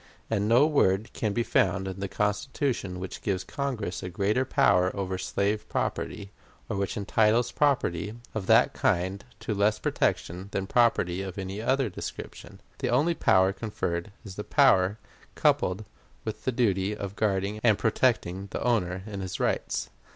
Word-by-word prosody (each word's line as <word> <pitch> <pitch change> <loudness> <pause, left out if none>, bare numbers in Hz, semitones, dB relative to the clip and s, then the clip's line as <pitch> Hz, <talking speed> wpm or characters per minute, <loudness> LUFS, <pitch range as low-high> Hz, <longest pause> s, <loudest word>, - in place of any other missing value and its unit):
And 105 -1 +1
no 120 +5 +6
word 110 -9 +2
can 110 - -1
be 120 +4 0
found 95 -3 +1
in 95 0 -5
the 100 - -2
Constitution 105 -1 -1
which 95 0 -6
gives 95 -2 -1
Congress 120 -6 -3
a 90 - -5
greater 105 +8 +1
power 90 -7 +3
over 95 -2 -3
slave 100 +3 -1
property, 100 -1 -3 0.4
or - - -3
which 100 -1 -2
entitles 110 +4 +2
property 110 - +1 0.2
of 105 -4 -4
that - - +5
kind 95 +3 0 0.2
to 110 - -2
less 105 +1 +2
protection 90 +3 -1
than 95 - -1
property 95 -5 +2
of 95 -1 -6
any 95 +2 -4
other 135 +2 +1
description. 95 - -8 0.2
The - - -1
only 145 +8 +3
power 95 - +3
conferred 95 -3 -3
is 95 -2 -9
the 105 - -3
power 105 -9 +4 0.4
coupled 95 +4 +1 0.4
with 110 -1 -5
the 130 - +2
duty 105 -4 +1
of 100 -1 -5
guarding 100 0 0
and 110 -4 +5
protecting 105 -5 +1
the - - -4
owner 95 -6 0
in 105 -3 -6
his 95 -1 -5
rights. - - -1
100 Hz, 160 wpm, -27 LUFS, 95-115 Hz, 0.4 s, no